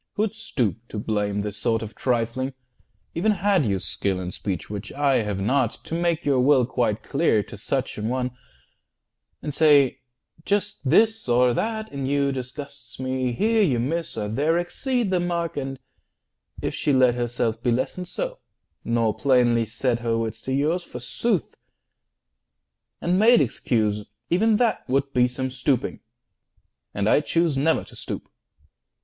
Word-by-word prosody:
Who'd 215 +1 -1
stoop 130 - -1
to 110 - -7
blame 105 -1 -1
This 105 0 -5
sort 115 +1 0
of 110 0 -7
trifling? 125 +2 -1 0.6
Even 210 +6 +2
had 195 - +2
you 100 -1 +1
skill 95 0 -2
In 90 -1 -4
speech 95 -1 -4
(which 105 0 -6
I 140 -1 +2
have 105 -3 -1
not) 120 +3 +1
to - - -7
make 170 0 0
your 140 -3 +3
will 130 -1 +5
Quite 115 -3 -1
clear 140 -8 +2
to - - -11
such 125 +3 -2
an 110 +2 -2
one, 125 0 -1 1.1
and 150 - -3
say, 145 -3 +5 0.4
"Just 205 +1 -1
this 220 - +3
Or 125 +1 +4
that 220 - -2
in 140 -2 -3
you 140 0 +2
disgusts 135 0 -8
me; 130 -1 -1
here 220 - +2
you 140 - +2
miss, 165 +6 -2
Or 105 -1 -2
there 145 +10 +1
exceed 230 +5 -1
the 185 - +2
mark" 170 -2 -1
and 135 -1 -4 0.9
if - - -1
she 145 - 0
let 130 -2 +5
Herself 120 -2 -1
be 120 - 0
lessoned 130 +9 -1
so, - - -4 0.4
nor 115 -2 +1
plainly 120 -4 +3
set 120 +2 -1
40 - - -13
Her 115 -1 +1
wits 110 -1 -3
to 130 - -5
yours, 155 +6 +1
forsooth, 170 - -2 1.5
and 180 +2 +2
made 235 +3 +7
excuse, 110 -4 0 0.3
E'en 215 +5 +4
that 235 -1 +2
would 135 +1 0
be 125 0 +4
some 130 +1 -3
stooping; 130 0 0 0.9
and 100 0 -1
I 145 - +5
choose 165 -1 +1
Never 150 +4 +2
to - - -15
stoop. - - -6
130 Hz, 160 wpm, -24 LUFS, 115-170 Hz, 1.5 s, made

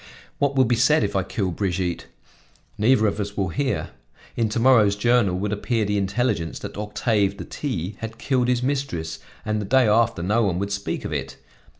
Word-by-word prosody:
What 140 -1 +1
will 130 -1 +5
be 120 +1 +2
said 120 +4 +4
if 100 0 -2
I 95 - +3
kill 95 +1 -2
Brigitte? 90 -1 -2 0.7
Neither 110 +1 +3
of 105 0 0
us 100 0 -4
will 95 -3 0
hear. 135 +7 -2 0.4
In 115 -2 +1
to 110 - -1
morrow's 115 -5 +5
journal 115 -3 +2
would 105 +2 -2
appear 110 +1 0
the 105 0 0
intelligence 95 - -1
that - - -7
Octave 105 -1 0
de - - -7
T 100 - -4
had 115 0 -6
killed 125 -2 0
his 125 -1 +1
mistress, 90 - -2 0.3
and 105 0 -1
the - - -4
day 130 +3 +4
after 110 -4 +2
no 105 +6 +2
one 95 -5 +1
would 100 +2 -2
speak 100 0 -3
of - - -3
it. 65 -2 -4
105 Hz, 200 wpm, -23 LUFS, 95-120 Hz, 0.7 s, will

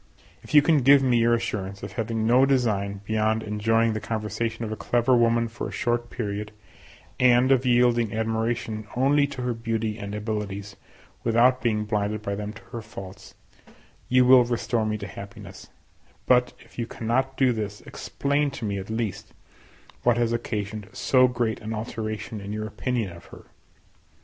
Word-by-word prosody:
If - - -5
you 145 - +8
can 155 -1 +4
give 135 +1 +6
me 125 -2 +3
your 115 0 +4
assurance 100 -4 -4
of - - -6
having 115 -1 -2
no 125 +3 +5
design 105 -7 +1
beyond 110 +1 0
enjoying 115 +2 +1
the 110 - -2
conversation 110 +1 -3
of 110 - -5
a - - -2
clever 120 +3 +2
woman 115 0 +3
for 115 - -6
a - - -7
short 120 0 -1
period, 105 -2 -4 0.7
and 125 +1 +5
of 130 -1 +3
yielding 120 -2 +3
admiration 110 0 -2
only 140 +3 +3
to 135 -3 -6
her 125 -1 0
beauty 115 -1 -2
and 100 0 -5
abilities, 105 -2 -4 0.5
without 120 +3 +3
being 105 -3 0
blinded 105 0 -1
by 100 - -2
them 105 +1 -4
to 115 - -13
her 115 - -5
faults, 100 -3 -11 0.7
you 125 0 +5
will 125 0 +8
restore 120 -2 -1
me 105 0 -1
to 100 -1 -7
happiness; 100 -1 -10 0.6
but, 125 -1 +3
if - - -14
you 115 - -2
cannot 130 +5 -1
do 130 -2 +3
this, 105 -2 -5
explain 140 +1 -1
to 135 -4 -6
me, 100 -1 -2
at 95 - -8
least, 110 -3 -4 0.7
what 120 -1 +3
has 120 -1 +1
occasioned 105 -3 -4
so 130 -1 +4
great 120 -3 -1
an 110 0 -4
alteration 110 -1 -5
in 100 +1 -6
your 110 0 -3
opinion 110 -1 -2
of 85 - -14
her. - - -14
115 Hz, 175 wpm, -25 LUFS, 105-120 Hz, 0.7 s, you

